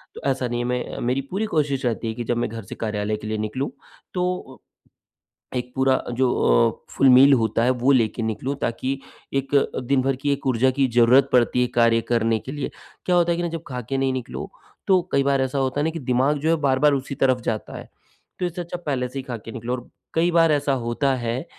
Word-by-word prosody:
तो - - -9
ऐसा 130 -2 0
नहीं 120 0 -2
है, 120 - -1
मैं 125 0 -3
मेरी 130 +2 +1
पूरी 200 +4 -1
कोशिश 140 -4 0
रहती 115 -1 -1
है 110 - -2
कि 120 - -5
जब 120 +1 -1
मैं 120 - -1
घर 115 0 -7
से 95 - -9
कार्यालय 105 -1 -2
के 105 - -8
लिए 110 0 -2
निकलूँ, 110 +6 -2 0.4
तो 180 -7 -3 0.7
अ, - - -9
एक 125 0 -4
पूरा 130 0 +2
जो 125 +1 +2 0.6
अ, - - -15
फुल 135 - +5
मील 135 +2 +8
होता 115 -2 +2
है 125 - +3
वो 135 +3 +4
लेके 115 -3 +2
निकलूँ 110 +5 -2
ताकि 130 +3 -2 0.3
एक 135 +1 -1
अ, 140 - +2
दिनभर 135 +1 +1
की 140 +2 -1
एक 140 -1 -5
ऊर्जा 130 0 +3
की 135 -1 +3
ज़रूरत 125 +3 +5
पड़ती 125 0 +3
है 125 - +2
कार्य 115 -1 +4
करने 115 -1 +2
के 130 - -8
लिए। 145 -1 -4 0.4
क्या 180 - +2
होता 175 -1 +3
है 170 - 0
ना 175 - -1
कि 165 - -3
जब 160 - -13
खाकर 125 0 -4
नहीं 135 0 +1
निकलो, 130 -2 -5 0.4
तो 185 -2 +5
कई 140 - +3
बार 140 -1 +2
ऐसा 130 +1 -1
होता 135 +1 0
है 160 +2 0
कि 165 - -5
दिमाग 130 +2 +1
जो 155 +3 0
है 165 - +4
बार-बार 140 +1 +3
उसी 140 0 -3
तरफ़ 130 -2 +2
जाता 110 -2 -4
है। - - -9 0.5
तो 180 - 0
इससे 175 0 -4
अच्छा 175 +1 -6
पहले 130 -4 -1
से 135 +2 -5
ही - - -5
खाके 115 -3 -7
निकलो 120 0 -4
और 125 -1 -6 0.2
कई 170 +2 +2
बार 165 -1 +4
ऐसा 145 -1 +1
होता 120 +4 0
है, 120 +3 -3
130 Hz, 235 wpm, -23 LUFS, 120-140 Hz, 0.7 s, मील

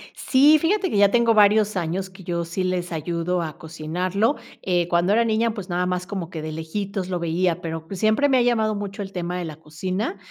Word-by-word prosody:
Sí, 285 +4 +5
fíjate 375 +4 +1
que 210 - -1
ya 200 0 +5
tengo 235 -1 +4
varios 210 0 +4
años 180 +3 -2
que 190 0 -14
yo 170 -1 -2
sí 170 +3 -3
les 180 -1 -2
ayudo 170 +2 -1
a 155 -3 -5
cocinarlo. 180 - -1 0.3
Eh, 175 -2 +1
cuando 175 +3 +2
era 235 +2 +4
niña, 225 0 +1
pues 200 -4 -7
nada 180 +1 0
más 180 0 -2
como 190 -5 -4
que 160 -4 -6
de 155 0 -5
lejitos 185 +4 -4
lo 180 -1 -1
veía, 170 +1 0
pero 160 -1 -5
pues 195 0 -6
siempre 220 +6 +3
me 260 - +4
ha - - +4
llamado 220 -3 +2
mucho 200 0 -5
el 195 -1 -6
tema 180 -1 -3
de 180 - -3
la 155 -2 -7
cocina. 185 +7 -4
185 Hz, 225 wpm, -23 LUFS, 170-210 Hz, 0.3 s, Sí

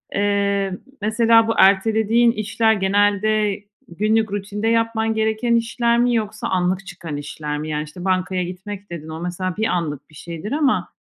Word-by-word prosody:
Eee, 200 -1 0 0.2
mesela 225 +1 +4
bu 225 - +1
ertelediğin 220 +4 +4
işler 220 0 +1
genelde 205 +1 +1 0.2
günlük 215 +4 0
rutinde 205 +2 -3
yapman 225 -1 +1
gereken 220 +2 +1
işler 235 0 +1
mi 245 0 +2
yoksa 215 -1 -2
anlık 185 +1 0
çıkan 170 -4 -6
işler 150 +1 -5
mi? 155 +1 -5
Yani 150 0 -2
işte 175 +4 -10
bankaya 185 0 0
gitmek 195 +3 -7
dedin. 160 -2 -7
O 160 +1 -6
mesela 180 +1 -3
bir 220 - 0
anlık 150 -5 -3
bir 155 - -18
şeydir 170 +6 -7
ama 290 -3 +1
205 Hz, 160 wpm, -21 LUFS, 180-220 Hz, 0.2 s, mesela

